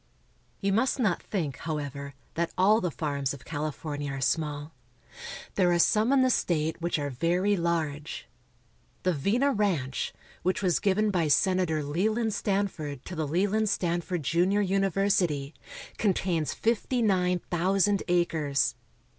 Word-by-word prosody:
You 195 Hz, -1 st, +1 dB
must 255 Hz, +7 st, +2 dB
not 210 Hz, -9 st, +1 dB
think, 160 Hz, -10 st, -3 dB
however, 140 Hz, -3 st, -5 dB, 0.2 s
that 170 Hz, 0 st, -1 dB
all 205 Hz, +4 st, +5 dB
the 180 Hz, -, 0 dB
farms 140 Hz, -4 st, -2 dB
of 135 Hz, -, -15 dB
Cali 155 Hz, 0 st, -2 dB
fornia 145 Hz, -1 st, -5 dB
are -, -, -4 dB
small. 150 Hz, +2 st, -1 dB, 0.8 s
There 180 Hz, -3 st, +3 dB
are 175 Hz, -, +3 dB
some 215 Hz, +7 st, +3 dB
in 270 Hz, -1 st, +5 dB
the 255 Hz, -, +3 dB
state 160 Hz, -5 st, 0 dB
which 170 Hz, 0 st, 0 dB
are 145 Hz, -1 st, -2 dB
very 175 Hz, +9 st, +1 dB
large. 160 Hz, -4 st, -2 dB, 0.8 s
The 185 Hz, -, +2 dB
Vina 225 Hz, -, +1 dB
Ranch, 180 Hz, -, -1 dB, 0.3 s
which 185 Hz, +3 st, 0 dB
was 180 Hz, -2 st, +2 dB
given 205 Hz, +1 st, +2 dB
by 175 Hz, -5 st, +1 dB
Sena 185 Hz, +5 st, +3 dB
tor 155 Hz, -2 st, -1 dB
Leland 215 Hz, +9 st, 0 dB
Stanford 185 Hz, -11 st, -2 dB
to 185 Hz, -, -6 dB
the 155 Hz, -2 st, -2 dB
Leland 200 Hz, +7 st, +1 dB
Stanford 175 Hz, -2 st, -1 dB
Junior 180 Hz, +7 st, +2 dB
Uni 195 Hz, 0 st, +1 dB
versity, 170 Hz, -7 st, +1 dB, 0.5 s
contains 180 Hz, -6 st, +1 dB
fifty 235 Hz, +2 st, 0 dB
nine 180 Hz, -3 st, +2 dB
thousand 195 Hz, +3 st, +2 dB
acres. 160 Hz, -5 st, +1 dB
175 Hz, 145 wpm, -28 LUFS, 150-200 Hz, 0.8 s, all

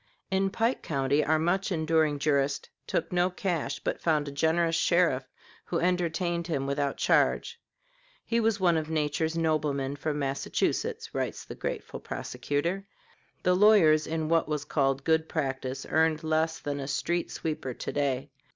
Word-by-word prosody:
In 190 Hz, 0 st, +2 dB
Pike 230 Hz, +5 st, 0 dB
County 140 Hz, 0 st, +1 dB
our 155 Hz, +1 st, +2 dB
much 185 Hz, +5 st, 0 dB
enduring 160 Hz, -3 st, +2 dB
jurist 140 Hz, -1 st, 0 dB, 0.2 s
took -, -, -1 dB
no 180 Hz, 0 st, +2 dB
cash, 175 Hz, -6 st, -2 dB
but -, -, -3 dB
found 155 Hz, -3 st, +1 dB
a -, -, -4 dB
generous 165 Hz, +3 st, +2 dB
sheriff 165 Hz, -7 st, +2 dB, 0.4 s
who 170 Hz, -, -2 dB
entertained 170 Hz, -1 st, 0 dB
him 140 Hz, -5 st, -1 dB
without 140 Hz, 0 st, -1 dB
charge. 470 Hz, 0 st, +2 dB, 0.6 s
"He 235 Hz, -, +1 dB
was 225 Hz, -2 st, +1 dB
one 175 Hz, -3 st, +3 dB
of 155 Hz, 0 st, -3 dB
nature's 160 Hz, +1 st, 0 dB
noblemen, 150 Hz, -4 st, 0 dB
from 150 Hz, +1 st, -2 dB
Massachusetts," 135 Hz, -1 st, -1 dB
writes -, -, -3 dB
the -, -, -7 dB
grateful -, -, -5 dB
prosecutor. 145 Hz, -, -3 dB, 0.6 s
The 180 Hz, -, +4 dB
lawyers 180 Hz, -7 st, +5 dB
in 160 Hz, -1 st, -2 dB
what 165 Hz, -1 st, +2 dB
was 150 Hz, -1 st, -2 dB
called 135 Hz, -2 st, +1 dB
good 160 Hz, 0 st, +2 dB
practice 135 Hz, -3 st, -3 dB
earned 160 Hz, 0 st, +2 dB
less 160 Hz, +1 st, +1 dB
than 145 Hz, -1 st, -4 dB
a 135 Hz, -, -4 dB
street 170 Hz, +5 st, -1 dB
sweeper 150 Hz, -6 st, -4 dB
to -, -, -4 dB
day. 140 Hz, -1 st, -1 dB
160 Hz, 155 wpm, -28 LUFS, 140-170 Hz, 0.6 s, lawyers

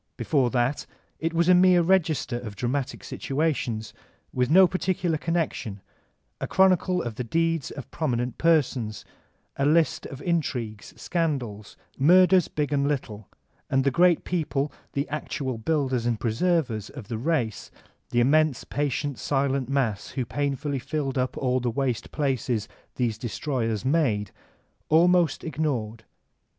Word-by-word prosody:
Before 135 Hz, -5 st, +1 dB
that 125 Hz, +3 st, 0 dB, 0.3 s
it 165 Hz, +1 st, -1 dB
was 170 Hz, +1 st, +1 dB
a 180 Hz, -, +7 dB
mere 180 Hz, -1 st, +5 dB
register 160 Hz, -9 st, +1 dB
of 110 Hz, -4 st, -8 dB
dramatic 125 Hz, +4 st, -2 dB
situations, 135 Hz, -7 st, -2 dB, 0.4 s
with 125 Hz, -1 st, +1 dB
no 185 Hz, +4 st, +8 dB
particular 185 Hz, -2 st, -1 dB
connection, 155 Hz, -, -2 dB, 0.6 s
a -, -, -3 dB
chronicle 185 Hz, -1 st, +3 dB
of 115 Hz, -3 st, -5 dB
the 125 Hz, -, -2 dB
deeds 165 Hz, +3 st, 0 dB
of 140 Hz, -, -9 dB
prominent 125 Hz, -5 st, -2 dB
persons, 135 Hz, -9 st, +1 dB, 0.5 s
a 140 Hz, -, +1 dB
list 160 Hz, +1 st, +2 dB
of 135 Hz, -, -9 dB
intrigues, 125 Hz, -, -3 dB
scandals, 130 Hz, -, -3 dB, 0.2 s
murders 180 Hz, +4 st, +6 dB
b^ 145 Hz, -3 st, -2 dB
and 140 Hz, -1 st, +1 dB
little; 110 Hz, -8 st, -4 dB, 0.4 s
and 135 Hz, 0 st, +2 dB
the 140 Hz, -, +2 dB
great 175 Hz, +3 st, +4 dB
people, 150 Hz, -5 st, -1 dB, 0.2 s
the 140 Hz, +1 st, -1 dB
actual 135 Hz, -4 st, -3 dB
builders 130 Hz, -3 st, 0 dB
and 115 Hz, -3 st, 0 dB
preservers 115 Hz, -, 0 dB
of 130 Hz, -9 st, -10 dB
the 115 Hz, -1 st, -4 dB
race, 125 Hz, -6 st, -1 dB, 0.4 s
the 120 Hz, -, +2 dB
immense 155 Hz, +2 st, +3 dB
patient, 145 Hz, -1 st, -2 dB
silent 135 Hz, -2 st, 0 dB
mass 120 Hz, -8 st, 0 dB
who 130 Hz, -, 0 dB
painfully 140 Hz, +1 st, -2 dB
filled 135 Hz, 0 st, -2 dB
up 125 Hz, 0 st, -1 dB
all 130 Hz, -1 st, +1 dB
the 125 Hz, -1 st, -1 dB
waste 125 Hz, -1 st, -2 dB
places 130 Hz, -6 st, -1 dB, 0.3 s
these 120 Hz, -4 st, -1 dB
destroyers 120 Hz, -2 st, -2 dB
made, 130 Hz, -, +1 dB, 0.6 s
almost 170 Hz, -1 st, +4 dB
ignored. 120 Hz, -9 st, -3 dB
140 Hz, 140 wpm, -26 LUFS, 120-160 Hz, 0.6 s, no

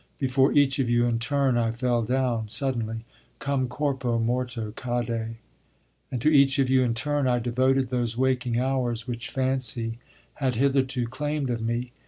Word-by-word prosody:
Before 135 Hz, 0 st, +2 dB
each 140 Hz, -1 st, +3 dB
of 130 Hz, -3 st, +1 dB
you 120 Hz, 0 st, +3 dB
in 115 Hz, -1 st, 0 dB
turn 135 Hz, 0 st, +1 dB
I 115 Hz, -1 st, +1 dB
fell 120 Hz, 0 st, 0 dB
down, 120 Hz, -1 st, 0 dB
suddenly, 115 Hz, -3 st, -1 dB, 0.3 s
"Come 135 Hz, -2 st, -1 dB
corpo 130 Hz, -2 st, -1 dB
morto 115 Hz, -1 st, -2 dB
cadde." 115 Hz, -1 st, -3 dB, 0.8 s
And 125 Hz, -, -2 dB
to -, -, +2 dB
each 140 Hz, -2 st, +5 dB
of 135 Hz, -2 st, +2 dB
you 130 Hz, -1 st, +5 dB
in 120 Hz, -2 st, +1 dB
turn 145 Hz, +2 st, 0 dB
I 125 Hz, -1 st, +2 dB
devoted 130 Hz, +2 st, +1 dB
those 120 Hz, -2 st, -1 dB
waking 125 Hz, -2 st, +1 dB
hours 125 Hz, -3 st, -1 dB
which 120 Hz, +1 st, -4 dB
fancy 125 Hz, -4 st, -1 dB, 0.4 s
had 130 Hz, -3 st, +1 dB
hitherto 130 Hz, -1 st, +1 dB
claimed 145 Hz, +1 st, -2 dB
of 115 Hz, -1 st, -2 dB
me. 120 Hz, +2 st, -2 dB
125 Hz, 165 wpm, -26 LUFS, 115-135 Hz, 0.8 s, each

